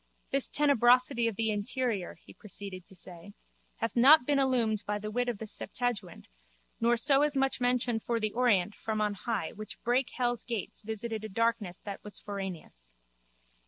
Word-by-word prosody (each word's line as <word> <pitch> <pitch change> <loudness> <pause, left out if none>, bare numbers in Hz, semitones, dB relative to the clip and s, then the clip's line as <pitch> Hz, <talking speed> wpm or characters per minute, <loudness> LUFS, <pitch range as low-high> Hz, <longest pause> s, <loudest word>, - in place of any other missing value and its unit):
This 275 -1 +2
tenebrosity 250 -3 +4
of 225 - -2
the 220 +1 +1
interior, 210 -1 -2
he - - -17
proceeded 195 -3 -8
to 190 - -13
say, 180 +3 -6 0.4
hath 230 - -3
not 265 +3 +7
been 285 0 +2
illumined 240 -6 +2
by 210 0 0
the 210 +1 -5
wit 245 +2 0
of 235 - -3
the 220 - -6
septuagint 215 -3 -3 0.5
nor 235 +1 +3
so 275 +3 +5 0.2
much 270 0 +1
as - - -20
mentioned 245 -2 +1
for 235 +1 -1
the 215 -1 0
Orient 210 -6 +2
from 215 0 -3
on 210 -1 +1
high 205 -3 -3
which 215 0 -9
brake 245 +1 +1
hell's 245 -2 -1
gates 230 -5 -5
visited 220 0 -4
a 215 - -5
darkness 220 -3 0
that 200 -1 -7
was 210 - -3
foraneous. 180 - -7
225 Hz, 175 wpm, -30 LUFS, 205-245 Hz, 0.5 s, not